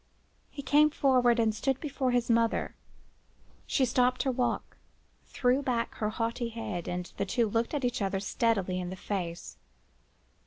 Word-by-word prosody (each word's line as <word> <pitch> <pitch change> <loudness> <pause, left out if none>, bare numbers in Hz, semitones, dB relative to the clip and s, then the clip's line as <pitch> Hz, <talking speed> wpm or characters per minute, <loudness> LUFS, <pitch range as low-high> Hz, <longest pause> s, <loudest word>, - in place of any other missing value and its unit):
He 280 - -8
came 295 +3 +5
forward 250 -5 +3
and 220 -1 +2
stood 265 +4 -1
before 280 -4 -2
his 245 -1 +1
mother. 230 -1 +1 0.9
She 265 - +2
stopped 250 0 +2
her 270 - +1
walk, 250 0 -2 0.5
threw 250 +2 +1
back 245 -4 -1
her 215 - -1
haughty 230 +2 -2
head, 220 -7 -5
and 180 0 -3
the 200 - 0
two 235 +3 +1
looked 230 +6 -1
each 245 -5 -1
other 195 -1 0
steadily 195 -2 0
in 180 -1 -4
the 185 - -5
face. 180 -3 -5
235 Hz, 155 wpm, -29 LUFS, 210-255 Hz, 0.9 s, came